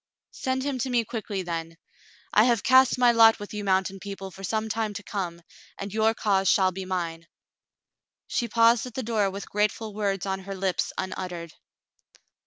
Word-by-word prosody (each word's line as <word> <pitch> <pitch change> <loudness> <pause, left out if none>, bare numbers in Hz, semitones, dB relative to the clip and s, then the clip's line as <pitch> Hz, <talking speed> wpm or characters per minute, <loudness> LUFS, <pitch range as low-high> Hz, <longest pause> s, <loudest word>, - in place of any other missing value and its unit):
"Send 260 0 -2
him 275 -2 -2
to 260 - -1
me 240 -2 +1
quickly, 210 -4 -4
then. 165 -1 -5 0.6
I 215 - +6
have 235 -5 +2
cast 260 -1 +5
my 245 -1 +5
lot 225 -1 +6
with 205 +1 -9
you 210 0 -4
mountain 190 0 +1
people 195 -1 -7
for 195 +2 -12
some 220 +3 -1
time 220 -1 -2
to 205 - -6
come, 180 -5 -4 0.3
and 200 0 -6
your 220 +1 +2
cause 195 -3 +2
shall 190 -1 +4
be 190 +1 -6
mine." 170 -3 -3 1.0
She 235 - -1
paused 230 +2 +4
at 245 - -11
the 260 - -2
door 215 -3 +1
with 200 +1 -7
grateful 210 +1 -1
words 200 -2 -1
on 190 -1 -2
her 195 +1 -7
lips 190 -1 -1
unuttered. 180 -3 -5
205 Hz, 185 wpm, -26 LUFS, 190-225 Hz, 1.0 s, I